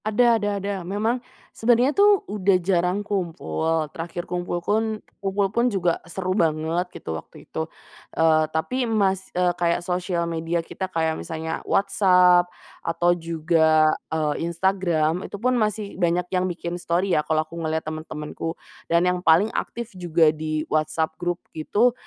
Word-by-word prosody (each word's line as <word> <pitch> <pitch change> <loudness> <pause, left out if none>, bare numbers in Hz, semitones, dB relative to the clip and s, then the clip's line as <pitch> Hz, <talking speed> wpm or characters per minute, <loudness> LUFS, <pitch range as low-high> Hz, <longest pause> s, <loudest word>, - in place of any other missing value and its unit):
Ada 230 +1 +3
ada 205 - 0
ada. 200 +1 -3
Memang 210 +7 -1 0.3
sebenernya 245 +4 +3
tuh 405 +1 +4
udah 200 - +2
jarang 180 +2 +1
kumpul, 165 - -1
terakhir 170 +1 -5
kumpul 175 0 -3
kun 220 +1 +1 0.2
kumpul 195 0 0
pun 240 +2 +3
juga 180 -6 0
seru 185 +1 -2
banget, 165 0 0
gitu, 80 - -7
waktu - - -16
itu. 160 0 -4 0.5
Eee, 155 -1 +4
tapi 235 +11 -1
mas 195 -3 +1
eee, 180 -1 +3
kayak 175 0 0
sosial 180 -1 -1
media 165 0 -2
kita 190 +2 -5
kayak 160 -3 0
misalnya 160 0 -4
WhatsApp, 180 -3 +4 0.3
atau 175 +1 +2
juga, 160 -2 +3 0.2
eee, 155 -2 0 0.2
Instagram, 170 -2 +1
itu - - -6
pun 250 +5 +1
masih 215 -3 -1
banyak 175 +1 +2
yang 185 0 +1
bikin 170 -1 -5
story, 175 +3 0
ya, - - +4
kalau 155 0 0
aku 155 - -18
ngelihat 160 0 -2
teman-temanku. 155 +1 -5 0.3
Dan 170 +1 +3
yang 180 0 +1
paling 180 +5 +4
aktif 235 -2 -4
juga 170 -4 +3
di 155 0 -3
WhatsApp 160 +1 0
grup 175 0 -1 0.2
gitu, 210 +10 +2
175 Hz, 150 wpm, -24 LUFS, 160-200 Hz, 0.5 s, tuh